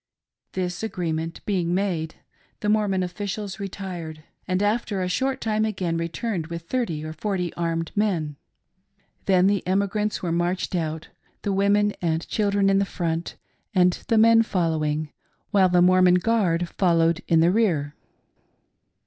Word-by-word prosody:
This 180 -1 -3
agreement 165 -6 -3
being 180 -4 0
made, 175 -5 -1 0.5
the 210 - 0
Mormon 205 -3 +2
oilficials 195 +2 -5
retired, 180 -5 -6 0.2
and 185 +2 0
after 210 -1 0
a - - -1
short 265 +8 0
time 215 -1 0
again 185 -6 -1
returned 165 +2 -3
with 170 0 -6
thirty 170 -8 -2
or 155 - -5
forty 180 0 -2
armed 165 -1 -2
men. 175 -8 0 0.9
Then 185 -1 +4
the 200 0 +2
emigrants 200 +2 0
were 175 - -1
marched 175 +3 -1
out 160 -2 -3 0.2
— - - -39
the 200 - 0
women 205 +1 +3
and 165 -1 -1
children 200 -2 +1
in 195 0 +4
the - - +3
front, 170 -4 -3 0.4
and 180 -1 +5
the 225 - +2
men 225 +1 +6
following, 155 -7 -1 0.4
while 195 -3 +4
the 175 0 +4
Mormon 185 0 +5
guard 180 -4 +1
followed 170 -2 +2
in 165 - +4
the 170 +2 +4
rear. 170 -10 +1
185 Hz, 150 wpm, -24 LUFS, 165-205 Hz, 0.9 s, men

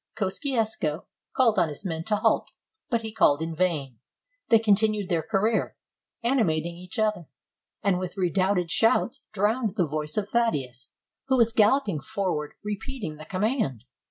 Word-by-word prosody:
Kosciusko 215 - -1 0.3
called 235 -4 +4
on 165 - +2
his 150 +6 -7
men 165 -3 -3
to 215 - +1
halt, - - +1 0.4
but 235 -3 +1
he 220 -1 -5
called 145 -9 +4
in 160 0 -4
vain; 150 -9 -1 0.5
they 225 - +7
continued 215 -2 +2
their 170 -2 +1
career, 220 +4 0 0.5
ani 250 +2 +2
mating 165 -2 0
each 180 +1 -9
other, 210 -7 0 0.6
and 195 -3 +2
with 185 +1 -5
redoubled 185 -1 +1
shouts 225 +5 +2
drowned 215 +1 0
the 180 -5 +2
voice 150 +2 -4
of 205 -1 0
Thaddeus, 140 - -1 0.4
who 265 -1 +3
was 230 -1 +4
galloping 215 - +3
forward 155 -3 -3
re 210 -1 -3
peating 210 - -6
the 155 - -9
command. 190 - -1
195 Hz, 155 wpm, -26 LUFS, 160-220 Hz, 0.6 s, they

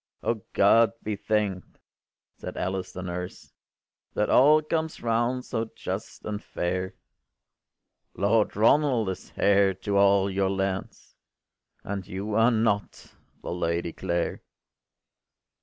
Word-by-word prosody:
” - - -45
“O 115 -2 -1
God 115 +3 +5
be 105 -1 -2
thank’d!” 100 -3 -2 0.6
said - - -8
Alice 95 0 -3
the 95 - -7
nurse, 90 0 -6 0.6
“That - - +1
all 150 +4 +6
comes 160 -1 -2
round 120 +2 0
so 110 0 -3
just - - -6
and 105 -1 -4
fair: 95 +2 -3 1.2
Lord 105 +2 +2
Ronald 115 0 +3
is 95 - -7
heir 100 -1 +4 0.2
of - - -4
all 100 0 +4
your 95 0 0
lands, 95 -1 -3 0.7
And 100 -2 -5
you 100 +3 -4
are 115 +2 +5
not 110 -3 -1 0.3
the - - -4
Lady 85 -1 -1
Clare. 85 0 -2
100 Hz, 125 wpm, -26 LUFS, 95-115 Hz, 1.2 s, all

